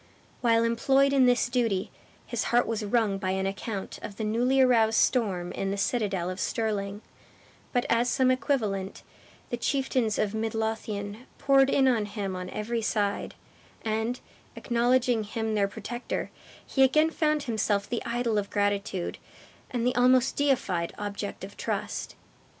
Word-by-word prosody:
While 230 -2 +4
employed 270 +4 +3
in 265 -2 +5
this 245 0 +3
duty, 230 -6 0 0.3
his - - -2
heart 240 +1 +3
was 225 -1 -2
wrung 210 -2 +1
by 185 - -2
an 190 0 0
account 195 +1 -4
of 205 - -7
the 220 - -4
newly 245 +5 +2
aroused 230 -4 +4
storm 190 -8 +1
in 195 - -3
the 200 - -2
citadel 195 -5 0
of 185 - -7
Stirling; 205 -2 -2 0.7
but 245 -2 +1
as 235 +1 +2
some 255 0 +3
equivalent, 220 -7 -1 0.5
the 240 - -1
chieftains 255 -4 0
of 210 -1 0
Mid 220 0 -2
Lothian 220 0 -3
poured 275 -1 +4
in 270 -1 +3
on 225 -5 +2
him 200 -2 -4
on 180 0 -5
every 230 +2 -2
side; 205 -2 -1 0.5
and, 225 +3 -1 0.4
acknowledging 240 -1 +2
him 220 +1 -3
their 205 -2 +2
protector, 225 +4 -5 0.3
he 270 - 0
again 305 +5 +5
found 305 -2 +1
himself 215 -5 0
the 240 - -3
idol 235 -2 0
of 200 - -4
gratitude, 200 -3 -1 0.5
and 240 -2 -2
the 250 - +2
almost 250 +1 +4
deified 205 -12 0
object 205 -1 -5
of 200 +1 -8
trust. - - -4
225 Hz, 155 wpm, -27 LUFS, 205-250 Hz, 0.7 s, in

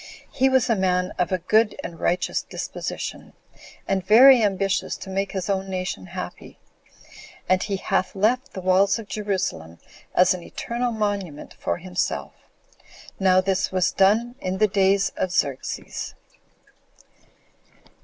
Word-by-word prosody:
He 265 0 +2
was 260 -2 +3
a 230 - +2
man 180 -1 0
of 180 - 0
a 185 - +2
good 215 +5 +2
and 165 - -7
righteous 180 +1 0
disposition, - - -6 0.5
and 190 -1 0
very 250 +4 +8
ambitious 195 -2 0
to 190 - -9
make 195 +1 -2
his 190 -3 -3
own 195 -1 -1
nation 185 - -4
happy; - - -8 0.9
and 185 0 +3
he 200 - -2
hath 190 0 -1
left 245 +7 +1
the 190 - -6
walls 190 +1 +3
of 225 -3 -9
Jerusalem 185 - -3 0.4
as 180 +1 +5
an 180 - -6
eternal 240 +7 -3
monument 200 -8 -3
for - - -3
himself. 180 0 -3 0.9
Now 185 -1 +4
this 190 0 0
was 185 -1 +1
done 220 +5 +3
in 185 0 -2
the 215 +2 +4
days 195 0 +2
of 185 - 0
Xerxes. 140 -7 -3
190 Hz, 140 wpm, -23 LUFS, 185-210 Hz, 0.9 s, very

